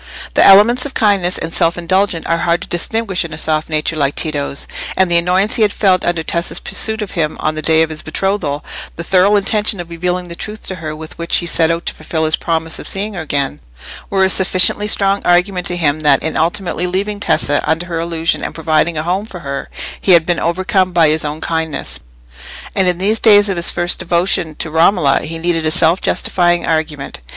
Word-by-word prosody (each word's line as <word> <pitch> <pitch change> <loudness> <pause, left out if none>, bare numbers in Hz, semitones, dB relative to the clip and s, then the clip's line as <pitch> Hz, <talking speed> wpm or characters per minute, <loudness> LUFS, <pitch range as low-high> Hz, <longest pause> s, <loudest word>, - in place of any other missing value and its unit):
The - - +4
elements 215 +6 +6
of 275 - -14
kindness 200 -5 +1
and 165 0 -5
self 165 +1 +1
indulgence 180 0 0
are 165 0 0
hard 175 +1 0
to - - -9
distinguish 195 +2 -2
in 170 -2 -7
a - - -10
soft 155 0 -1
nature 155 +1 -1
like 145 -2 0
Tito's; 145 -3 -2 0.3
and 190 -2 +2
the 170 - +4
annoyance 185 +4 +1
he - - -1
had 210 -1 +3
felt 190 -3 +2
under 170 -2 -1
Tessa's 170 +2 -2
pursuit 220 -1 0
of 200 - -8
him 155 -4 -2
on 155 - -1
the 155 - -5
day 160 +1 +3
of 160 - -3
his 155 - -5
betrothal, 155 -4 -2 0.3
the 170 - -6
thorough 190 +3 +3
intention 205 0 +1
of 170 -1 -7
revealing 180 +1 -2
the 170 - -8
truth 215 +4 -7
to 190 - -5
her 155 -2 -6
with 155 0 -9
which 170 +1 -1
he 175 - 0
set 165 -1 +2
out 165 +1 -2
to - - -2
fulfil 160 -1 -3
his 155 - +1
promise 165 -1 -2
of - - -2
seeing 205 +2 -2
her 175 - -5
again, 140 - -2 0.5
were 195 -1 +1
a - - +1
sufficiently 190 +2 +2
strong 200 -1 +2
argument 180 +1 +1
to 175 - -2
him 155 -3 0
that 145 -3 +3
in 160 - -2
ultimately 175 +2 -1
leaving 200 +3 -2
Tessa 145 -7 +1
under 160 +2 0
her 170 -2 -4
illusion 165 0 -1
and - - -5
providing 160 +1 0
a 155 - -2
home 185 +5 -2
for 180 -5 -10
her, 140 -2 -5 0.3
he 190 - +4
had 165 -2 +5
been 175 0 0
overcome 185 +2 0
by 165 -3 +4
his 155 +1 +1
own 150 +1 -5
kindness. 160 -2 -2 0.8
And 190 -1 +2
in 180 -1 +1
these 210 +4 +2
days 205 -2 +5
of 195 - -1
his 170 -1 +3
first 175 0 0
devotion 170 -2 0
to 160 - -4
Romola 160 -3 +3
he 165 +1 -5
needed 165 0 -1
a - - +2
self 165 +2 +3
justifying 175 -1 +1
argument. 155 -3 -3
170 Hz, 220 wpm, -15 LUFS, 160-190 Hz, 0.8 s, elements